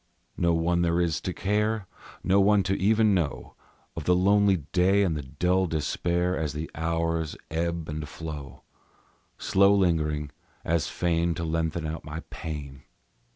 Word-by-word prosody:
No 85 -1 +2
one 85 +1 +1
there 85 0 +2
is 85 -3 0
to 95 - -3
care; 105 +3 0 0.4
Not 95 +2 +3
one 100 0 +4
to 95 +2 0
even 110 +2 +3
know 85 -7 -2 0.4
Of - - -5
the 90 - +4
lonely 100 -3 +3
day 95 +3 +3
and 85 -5 0
the 75 - -3
dull 90 +7 0
despair 85 +3 0
As 75 -2 -2
the 75 +2 -5
hours 80 0 -1
ebb 85 0 -2
and 75 -1 -5
flow, 75 -4 -8 0.7
Slow 100 +1 +4
lingering, 75 -6 +1 0.3
as 80 -3 +1
fain 85 -1 0
to 85 - -4
lengthen 80 0 -1
out 80 +1 -4
my 75 +2 -6
pain. 70 -4 -6
85 Hz, 155 wpm, -27 LUFS, 80-95 Hz, 0.7 s, one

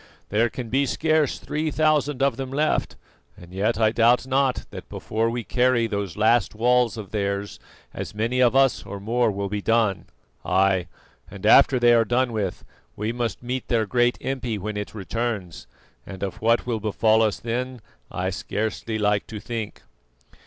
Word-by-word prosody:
There 115 +3 +2
can 120 0 -7
be 135 +4 +1
scarce 155 -1 +1
three 155 +1 -3
thousand 150 -3 +1
of 140 -4 +2
them 135 +1 -5
left, 150 +3 0 0.4
and 85 0 -14
yet 105 +4 0
I 110 -1 +4
doubt 120 +2 +3
not 130 0 +1
that - - -9
before 110 +1 -1
we 120 0 -3
carry 125 0 +2
those 100 -5 -4
last 110 0 +2
walls 120 -1 +2
of 105 -3 -8
theirs 100 -1 -2 0.3
as - - -6
many 115 +4 -1
of 120 0 +4
us 135 -10 +3
or 100 0 -7
more 115 +3 +1
will 100 -1 -3
be 105 +1 -3
done. 110 -3 +1 0.4
Ay! 95 -1 +2 0.4
and - - -9
after 130 - +6
they 120 0 +5
are 115 -1 +5
done 120 +2 0
with, 100 -5 -3 0.3
we 105 +2 -2
must 120 -2 -3
meet 125 +1 -4
their 115 -3 +1
great 120 +2 +2
impi 125 -4 -3
when 105 +2 -5
it 105 +1 -5
returns, 105 -3 -4 0.4
and 95 -1 -8
of 95 - -5
what 115 +1 +2
will 120 -3 -1
befall 110 +1 +2
us 110 -2 +1
then 125 +2 -3 0.3
I 95 +1 -2
scarcely 110 +3 -3
like 105 -1 +1
to 110 - -7
think." 115 0 -6
115 Hz, 175 wpm, -24 LUFS, 105-125 Hz, 0.4 s, after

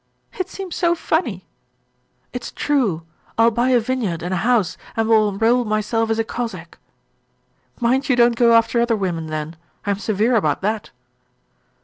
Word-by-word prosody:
'It 370 -1 -4
seems 385 -3 -6
so 345 -1 +2
funny!' 265 - -1 0.9
'It's 250 - -5
true! 235 - 0 0.3
I 225 - +5
will 230 - +5
buy 240 +3 +1
a 250 -2 +5
vineyard 225 -8 -2
and 180 +2 -2
a - - 0
house 220 -2 +1 0.2
and 225 0 +1
will 215 -2 +4
enroll 225 +5 +2
myself 215 +1 0
as 225 - +1
a 225 - +1
Cossack.' 215 -8 -6 1.0
'Mind 255 +4 +1
you 255 - +4
don't 240 -1 +4
go 235 0 +4
after 230 +1 +3
other 235 -1 +2
women 175 -6 -2
then. 155 +1 -4 0.3
I 205 - +1
am 200 - -2
severe 215 +4 +1
about 155 -10 +1
that.' 215 +2 -2
225 Hz, 170 wpm, -21 LUFS, 200-245 Hz, 1.0 s, I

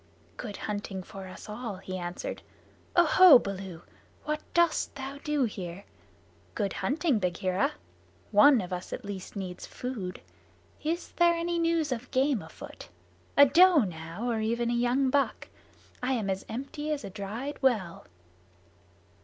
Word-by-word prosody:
"Good 210 -4 -6
hunting 205 -2 -4
for 195 +1 -9
us 185 - -10
all," 215 0 -5
he 185 0 -6
answered. 180 - -5 0.5
"Oho, 350 -2 +8
Baloo, 190 -6 -6 0.4
what 305 0 -2
dost 340 -4 +2
thou 275 +1 -6
do 300 -2 +1
here? 190 -4 -4 0.7
Good 200 -3 -1
hunting, 290 -3 +1
Bagheera. 185 +1 0 0.6
One 225 +4 +7
of 180 0 -6
us 180 0 -5
at - - -6
least 200 -1 -7
needs 185 -2 -6
food. 215 -8 -5 0.6
Is 330 +3 -2
there 345 0 +5
any 340 0 -1
news 330 -3 +1
of 250 0 -3
game 265 -3 +2
afoot? - - -11 0.5
A 285 - +10
doe 340 0 +6
now, 170 +4 -5
or 230 -2 0
even 235 +2 0
a - - +1
young 245 +3 +2
buck? 280 0 0 0.5
I 255 +1 0
am 215 -6 0
as 190 0 -4
empty 285 +6 -4
as 290 -4 -2
a 200 - -7
dried 220 +9 -5
well." 215 -11 +1
235 Hz, 145 wpm, -29 LUFS, 195-285 Hz, 0.7 s, A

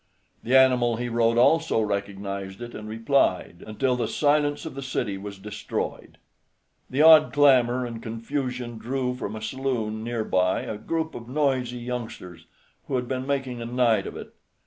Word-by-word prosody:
The 130 +3 +3
animal 125 -3 +4
he 120 +1 -3
rode 115 0 +2
also 160 +2 +4
recognized 100 -1 -3
it, 120 0 -8
and 105 0 -8
replied, 110 -6 0
until 125 +4 0
the 125 - -1
silence 145 0 +1
of 160 - -6
the 135 - -6
city 125 -6 -2
was 100 +1 -8
destroyed. 105 +2 -5 0.7
The 140 +4 +2
odd 160 -1 +8
clamor 130 -4 +4
and 115 -1 -6
confusion 120 0 -4
drew 125 +1 -2
from 110 -4 -5
a 110 - -7
saloon 115 -4 -2
near 115 -1 -2
by 90 -2 +1
a 105 - -5
group 160 +6 -2
of 115 0 -9
noisy 130 -3 0
youngsters, 115 -9 -7 0.4
who 135 - -2
had 125 -1 -1
been 130 0 -3
making 135 -4 -2
a - - -4
night 120 -2 +2
of - - -7
it. - - -10
120 Hz, 170 wpm, -25 LUFS, 110-130 Hz, 0.7 s, odd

